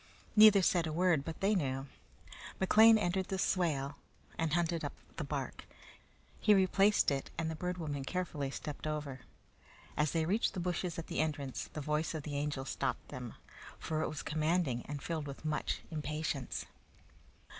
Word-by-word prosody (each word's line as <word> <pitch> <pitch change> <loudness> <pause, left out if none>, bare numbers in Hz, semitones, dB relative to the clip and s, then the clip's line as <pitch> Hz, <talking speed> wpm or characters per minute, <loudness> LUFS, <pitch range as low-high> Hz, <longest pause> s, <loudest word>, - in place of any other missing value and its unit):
Neither 210 -3 +8
said 170 -2 +3
a - - -2
word, 170 -3 +3
but 160 +2 -6
they 200 +2 +3
knew. 135 -7 -1 0.7
McLean 220 +4 +7
entered 190 -1 0
the 190 - -2
swale 145 -7 0 0.4
and 165 -2 -1
hunted 170 -1 +1
up - - -3 0.2
the - - -2
bark. - - -4 0.7
He 210 -1 +5
replaced 195 0 +4
it, 135 -1 -2
and 160 0 -1
the - - -4
Bird 180 +3 -3
Woman 145 -5 -3
carefully 150 -3 -2
stepped 150 +2 -5
over. 150 -3 -3 0.8
As 150 0 +2
they 160 +1 +1
reached 205 +7 +1
the - - -2
bushes 175 -1 -2
at 165 - -4
the - - -3
entrance, 145 -4 -2
the 155 - -4
voice 150 +3 -1
of 155 - -4
the 145 -1 -5
Angel 145 -2 -2
stopped - - -2
them, - - -7 0.4
for 155 0 -2
it - - 0
was 150 -2 -5
commanding 155 -5 0
and 145 -1 -5
filled 160 -3 -3
with 140 +2 -8
much 155 -1 -1
impatience. 150 -3 -3
155 Hz, 170 wpm, -34 LUFS, 145-180 Hz, 0.8 s, Neither